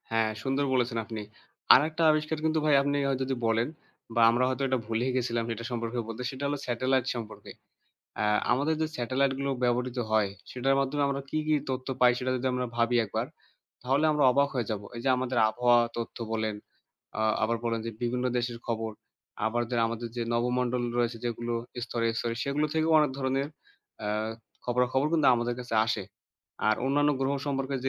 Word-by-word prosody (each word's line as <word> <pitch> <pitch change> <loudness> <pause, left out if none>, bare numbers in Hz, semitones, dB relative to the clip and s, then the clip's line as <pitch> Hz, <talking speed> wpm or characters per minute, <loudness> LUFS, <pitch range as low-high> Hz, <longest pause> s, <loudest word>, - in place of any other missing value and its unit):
হ্যাঁ, 110 -1 +2
সুন্দর 135 +2 0
বলেছেন 120 -2 +1
আপনি। 110 0 -5 0.5
আরেকটা 155 +4 +3
আবিষ্কার 155 +1 0
কিন্তু 160 0 +2
ভাই 150 -2 +5
আপনি 145 +1 0
হয়তো 135 -1 -1
যদি 135 0 -1
বলেন 115 +1 +2 0.5
বা 120 - +3
আমরা 120 +2 +2
হয়তো 130 +1 -1
এটা 130 0 +1
ভুলেই 115 +3 0
গেছিলাম 120 -2 0
সেটা 115 0 -5
সম্পর্কে 115 0 -2
বলতে, 115 +2 -6
সেটা 135 0 -7
হলো 145 +1 -1
satellite 130 +1 +1
সম্পর্কে। 115 -2 -7 0.7
অ্যা 105 - +1 0.2
আমাদের 145 +6 +2
যে 160 - +1
satellite 130 +3 +1
গুলো 140 0 -1
ব্যবহৃত 125 +1 0
হয় 110 -2 +3 0.2
সেটার 135 +2 +1
মাধ্যমে 140 +2 0
আমরা 140 0 -1
কী, 155 - -1
কী 155 - +4
তথ্য 130 0 -3
পাই 125 -1 +7
সেটা 130 0 -1
যদি 130 +1 -1
আমরা 125 0 -1
ভাবি 115 +1 +2
একবার 100 - -2 0.6
তাহলে 135 +4 +2
আমরা 150 -2 +2
অবাক 140 +2 +3
হয়ে 120 -4 -1
যাব। 105 -2 -2
এই - - -4
যে - - +2
আমাদের 130 -1 -1
আবহাওয়া 120 +2 +4 0.2
তথ্য 115 - -5 0.2
বলেন, 110 -1 -1 0.6
আ - - 0 0.2
আবার 115 +2 +2
বলেন 115 -1 0
যে - - -2
বিভিন্ন 125 +1 -1
দেশের 120 -1 -2
খবর, 115 -1 -2 0.6
আবার 120 +2 0
যে 125 - 0
আমাদের 115 +1 -4
যে 120 - -1
নবমণ্ডল 125 +1 0 0.2
রয়েছে 120 -1 0
যেগুলো 120 0 -2 0.3
স্তরে, 115 -2 -1
স্তরে 115 -1 -2
সেগুলো 145 +2 +1
থেকেও 160 0 +2
অনেক 150 -2 +3
ধরনের 135 +1 0 0.5
অ্যা 105 -1 -2 0.5
খবরা-খবর 125 +3 +1
কিন্তু 155 -3 +3
আমাদের 120 0 -1
কাছে 120 -2 -5
আসে। 110 -3 -1 0.6
আর 110 - +4
অন্যান্য 145 +2 +3
গ্রহ 135 +1 +1
সম্পর্কে 135 -1 -1
যে - - +2
125 Hz, 185 wpm, -28 LUFS, 115-135 Hz, 0.7 s, পাই